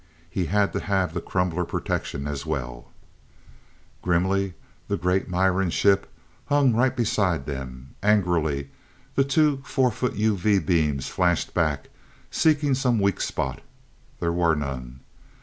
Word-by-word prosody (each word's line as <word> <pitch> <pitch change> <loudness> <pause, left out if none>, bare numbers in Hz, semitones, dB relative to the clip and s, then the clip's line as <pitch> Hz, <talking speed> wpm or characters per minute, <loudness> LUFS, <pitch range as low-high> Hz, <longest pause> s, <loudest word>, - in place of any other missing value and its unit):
He 90 -1 -1
had 100 +1 +2
to - - -1
have 95 -4 0
the - - -3
crumbler 90 -2 -1
protection 70 -4 -3
as 75 -2 -4
well! - - -5 1.1
Grimly 95 +1 +1 0.3
the - - -1
great 90 +2 0
Miran 95 +1 +2
ship 95 +3 +2 0.4
hung 145 -4 +4
right 130 +3 +2
beside 95 - +1
them. 65 -2 -7
Angrily 85 -9 +1 0.4
the 135 - +3
two 140 0 +2
four 130 -2 +1
foot 125 +3 -2
UV 105 -2 +2
beams 75 -7 +1
flashed 90 -2 0
back 70 -3 0 0.4
seeking 150 -3 +3
some 130 -3 +2
weak 100 -1 +1
spot. - - -2 0.6
There 85 0 0
were 85 -2 +3
none. 65 -3 -5
90 Hz, 130 wpm, -25 LUFS, 75-105 Hz, 1.1 s, hung